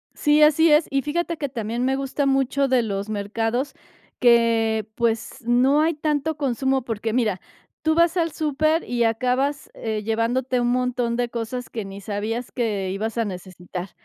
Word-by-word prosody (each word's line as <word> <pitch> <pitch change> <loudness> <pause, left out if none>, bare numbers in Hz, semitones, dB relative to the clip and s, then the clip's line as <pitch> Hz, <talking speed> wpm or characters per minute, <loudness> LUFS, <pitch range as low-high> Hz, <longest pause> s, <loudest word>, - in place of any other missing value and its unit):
Sí, 300 0 +3
así 310 +1 +5
es. 300 +2 +5
Y 275 0 +1
fíjate 335 +3 -2
que 290 -2 -3
también 235 -1 -3
me 265 +1 +1
gusta 275 +1 -1
mucho 270 0 +2
de 255 -2 +3
los 200 -2 -3
mercados 225 +6 -2 0.4
que, 230 -3 +3
pues, 230 -1 -1
no 255 +5 +4
hay 325 +2 +2
tanto 300 0 -1
consumo 265 -1 0
porque, 225 -1 -3
mira, 215 -6 0 0.4
tú 315 0 +2
vas 335 +1 +3
al 330 -2 0
súper 310 +2 +1
y 240 -1 0
acabas, 255 +5 0
eh, 220 -2 -3
llevándote 240 +4 0
un 240 - +1
montón 245 -1 0
de 240 -1 -1
cosas 235 +1 -5
que 220 -4 -5
ni 195 +1 -8
sabías 215 +4 -3
que 210 -6 -1
ibas 215 +4 -3
a 230 - +1
necesitar, 180 -1 -7
245 Hz, 170 wpm, -23 LUFS, 225-280 Hz, 0.4 s, así